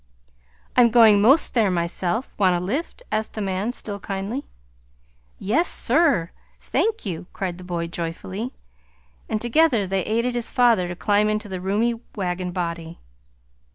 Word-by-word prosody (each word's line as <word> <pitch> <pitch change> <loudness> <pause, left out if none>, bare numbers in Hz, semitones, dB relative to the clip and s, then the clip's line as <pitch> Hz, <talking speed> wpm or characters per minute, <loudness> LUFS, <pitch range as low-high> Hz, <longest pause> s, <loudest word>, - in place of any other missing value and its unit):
"I'm 240 -1 +6
going 220 -3 +6
'most 270 +9 +4
there 225 -5 +3
myself. 180 +6 -2
Want 185 -3 +4
a - - 0
lift?" 275 - -4
asked 220 0 -1
the - - -6
man, 195 +3 -1
still 205 -4 -5
kindly. 200 +7 -4 0.9
"Yes, 290 - +1
sir. 245 - +2 0.3
Thank 445 - -1
you!" 175 -3 -5
cried 185 -2 -4
the - - -9
boy 175 -2 -3
joyfully. 175 +7 -4 0.8
And 215 - 0
together 240 -2 +3
they 190 0 -1
aided 235 +5 0
his 240 -1 -1
father 235 -8 +3
to 175 - -5
climb 205 +3 +2
into 215 0 -2
the 185 -2 -5
roomy 225 +5 0 0.2
wagon 180 -2 -2
body. 170 -2 -4
205 Hz, 150 wpm, -23 LUFS, 180-235 Hz, 0.9 s, I'm